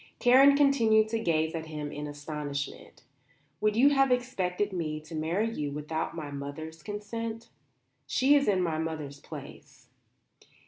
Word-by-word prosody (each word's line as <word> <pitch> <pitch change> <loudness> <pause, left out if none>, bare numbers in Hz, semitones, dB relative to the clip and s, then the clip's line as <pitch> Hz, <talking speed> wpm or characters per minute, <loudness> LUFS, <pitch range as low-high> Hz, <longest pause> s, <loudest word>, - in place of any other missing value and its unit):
Karen 270 +3 +6
continued 230 -7 +4
to 225 0 -1
gaze 160 -5 +1
at 160 -1 -5
him 150 -2 -5
in 150 0 -5
astonishment. 145 -2 -6 0.6
"Would 215 +1 +1
you 265 +5 +6
have 270 -2 +3
expected 205 -6 0
me 155 -4 -2
to 155 +2 -12
marry 165 +8 0
you 145 -6 -3
without 150 +3 -3
my 150 -3 -6
mother's 145 +3 -7
consent? 225 +4 -5 0.6
She 270 +2 +3
is 280 -1 +3
in 190 -3 +3
my 160 -2 -1
mother's 155 -3 -4
place." 140 -3 -11
165 Hz, 145 wpm, -29 LUFS, 150-225 Hz, 0.6 s, Karen